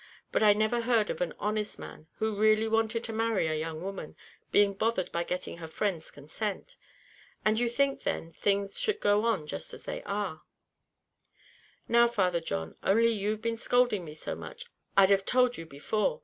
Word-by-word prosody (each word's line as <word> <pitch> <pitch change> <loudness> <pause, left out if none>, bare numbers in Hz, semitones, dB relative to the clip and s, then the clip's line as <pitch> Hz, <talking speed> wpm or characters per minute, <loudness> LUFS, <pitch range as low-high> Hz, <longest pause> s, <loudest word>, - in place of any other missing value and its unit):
But - - +1
I 210 -1 +7
never 215 +3 +1
heard 230 -3 +2
of - - -6
an 175 -2 -1
honest 210 0 -2
man, 155 - -10
who 220 -1 -1
really 215 +1 +4
wanted 225 +1 +1
to 225 - -5
marry 225 -4 +1
a 160 - 0
young 160 +1 -4
woman, 195 -5 -6 0.4
being 205 -1 +4
bothered 205 -2 0
by 170 - -1
getting 180 0 -4
her 165 -1 -7
friends' 170 -1 -2
consent. 200 - -5 0.7
And 215 +1 +3
you 240 -1 +2
think, 275 +3 +1
then, 165 0 -3
things 200 +2 0
should 435 -1 0
go 205 +2 +3
on 215 -10 +1
just 80 - -5
as - - -13
they - - -5
are?" 200 -6 -3 1.5
"Now, 235 0 +5
Father 185 -7 +1
John, 80 - -4
only 230 +4 +4
you've 215 0 -2
been 230 0 -1
scolding 245 -4 +2
me 150 -2 -9
so - - -5
much, - - -8 0.3
I'd 195 0 +7
have 195 -1 +4
told 250 +2 +3
you 165 -4 -8
before. 210 - -1
210 Hz, 185 wpm, -29 LUFS, 180-230 Hz, 1.5 s, I